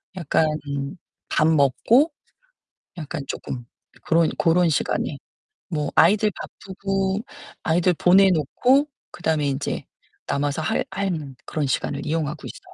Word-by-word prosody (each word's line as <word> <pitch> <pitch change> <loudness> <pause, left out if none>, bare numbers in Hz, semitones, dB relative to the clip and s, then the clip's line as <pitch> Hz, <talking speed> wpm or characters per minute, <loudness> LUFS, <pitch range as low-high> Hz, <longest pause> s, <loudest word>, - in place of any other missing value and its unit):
약간 160 -2 +1 0.8
밥 155 - +3
먹고 160 - +4 0.9
약간 155 -1 -5
쪼끔 125 -2 -5 0.4
그런 165 -1 +3
고런 170 +1 +4
시간에. 150 - -1 0.5
뭐 150 -4 -2
아이들 210 +5 +5
바쁘고 195 0 -3 0.4
아이들 175 +2 +2
보내 190 +4 +5
놓고 250 - +2 0.2
그다음에 160 -4 0
인제 140 +1 -2 0.4
남아서 145 +2 -1
할 155 - 0
하는 180 -8 -3
그런 150 -3 -2
시간을 140 +2 -2
이용하고 155 0 -2
있어요. 370 -1 -12
165 Hz, 255 characters per minute, -23 LUFS, 150-190 Hz, 0.9 s, 아이들